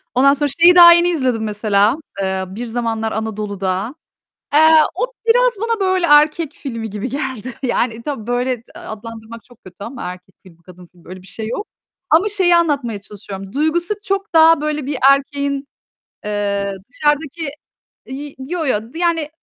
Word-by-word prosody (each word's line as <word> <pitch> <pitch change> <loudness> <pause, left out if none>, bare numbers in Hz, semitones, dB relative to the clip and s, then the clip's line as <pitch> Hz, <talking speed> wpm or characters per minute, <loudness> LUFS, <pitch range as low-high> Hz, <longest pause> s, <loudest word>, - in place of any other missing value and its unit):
Ondan 275 +2 +5
sonra 290 0 0
şeyi 355 +1 +7
daha 345 -1 +10
yeni 345 +1 +3
izledim, 255 -9 0
mesela, 210 +3 +1 0.2
eee, 190 0 -1
"Bir 215 +6 -6
Zamanlar 225 -1 -2
Anadolu'da." 205 +1 -3 0.6
Eee, 315 +1 +6 0.2
o - - 0 0.2
biraz - - +4
bana 455 -1 -1
böyle 375 -2 +1
erkek 300 +1 +4
filmi 230 -5 -6
gibi 210 +5 -5
geldi. 260 -3 -4
Yani, 235 -2 -1
tabii 240 -5 -6
böyle, 245 +1 0
d - - -20
adlandırmak 225 +1 -9
çok 245 -2 -22
kötü 180 -1 -14
ama 235 +5 -8
erkek 180 +1 -9
filmi, 170 -2 -19
kadın 180 0 -15
filmi, 175 -2 -22
öyle 185 0 -9
bir 190 - -17
şey 220 +1 -6
yok 410 - -4 0.4
ama 345 +7 +4
şeyi 370 -4 +3
anlatmaya 275 -11 0
çalışıyorum. 200 -1 -10
Duygusu 335 +6 0
çok 390 -2 -3
daha 320 -1 +6
böyle 300 -2 -2
bir 280 -2 -3
erkeğin, 280 0 -1 0.6
eee, 200 -1 -2 0.2
dışarıdaki 295 +1 -1 0.6
iii, 280 +2 -7
yo 315 +4 -4
yo, 225 -1 -2
d 325 - -8
yani, 335 -3 0
255 Hz, 165 wpm, -18 LUFS, 210-315 Hz, 0.6 s, daha